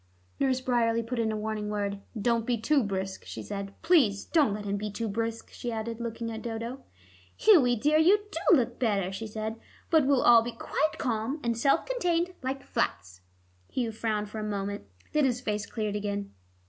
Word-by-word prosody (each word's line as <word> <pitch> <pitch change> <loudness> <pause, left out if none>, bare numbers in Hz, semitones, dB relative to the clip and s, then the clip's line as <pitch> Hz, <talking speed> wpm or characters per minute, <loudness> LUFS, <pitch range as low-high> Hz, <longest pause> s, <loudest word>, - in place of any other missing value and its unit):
Nurse 260 -2 +2
Bryerley 230 -2 +1
put 245 +1 -3
in 220 -1 +1
a 215 - -2
warning 210 -1 -3
word. 200 -1 -2 0.2
"Don't 230 +2 +2
be 245 -1 +2
too 280 +6 +2
brisk," 195 -3 -3
she - - -7
said. 200 -1 -6
"Please 270 - +4
don't 300 -9 +3
let 205 0 -4
him 200 0 -1
be 210 +1 -3
too 225 +3 -3
brisk," 225 +2 -3
she 240 - -4
added, 230 +1 -4
looking 230 0 -4
at 220 0 -5
Dodo. 235 +3 -5 0.5
"Hughie, 295 - +6
dear, 300 +7 +3
you 405 +6 +5
do 345 -1 +4
look 240 -4 -1
better," 200 -6 +1
she 220 +3 -5
said; 220 +1 -4 0.3
"but 315 -5 +5
we'll 275 -2 +3
all 235 -1 +8
be 235 +1 -4
quite 300 +6 -1
calm, 235 +4 -1
and 235 -1 0
self 275 +5 +2
contained 360 -8 0
like 265 +1 -3
flats." 90 +1 -2 0.5
Hugh 240 -3 -1
frowned 215 -2 -2
for 220 - -5
a - - -3
moment; 200 - -3 0.3
then 300 - +3
his 250 -3 +2
face 210 -3 -2
cleared 215 -2 -3
again. 200 -1 -3
230 Hz, 195 wpm, -28 LUFS, 210-260 Hz, 0.5 s, all